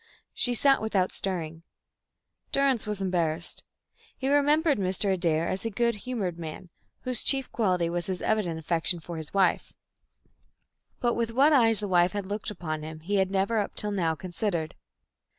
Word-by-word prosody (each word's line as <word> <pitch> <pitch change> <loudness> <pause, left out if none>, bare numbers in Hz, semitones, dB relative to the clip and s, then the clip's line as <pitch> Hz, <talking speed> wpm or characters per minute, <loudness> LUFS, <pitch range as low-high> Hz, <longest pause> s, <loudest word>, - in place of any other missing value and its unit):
She 245 -1 +1
sat 275 +3 +4
without 200 -4 0
stirring. 165 -4 -3 0.9
Durrance 270 -6 +2
was 210 -2 -3
embarrassed. 170 -2 -1 0.5
He 265 - -2
remembered 290 0 +3
Mr. 190 +1 0
Adair 170 -3 0
as 190 - -2
a 225 - -1
good 235 +2 +1
humoured 205 -6 -4
man, 165 +2 -7 0.3
whose 255 -3 +2
one - - 0
chief 270 -2 +2
quality 180 -6 +1
was 170 0 -3
his 185 -2 -2
evident 200 -7 0
affection 165 +2 0
for 170 +1 -7
his 160 -1 -6
wife, 190 -3 +1 1.3
but 240 -1 +2
with 230 -1 -1
what 280 +6 +4
eyes 225 -6 +5
the 205 - -2
wife 175 0 +3
had 205 -2 -3
looked 205 +2 -4
upon 160 -6 -5
him 155 0 -8
he 200 +5 -1
had 190 -1 +2
never 195 +3 +1
up 205 - -3
till 210 - -1
now 170 -5 0
considered. 170 0 -3
195 Hz, 170 wpm, -27 LUFS, 170-225 Hz, 1.3 s, eyes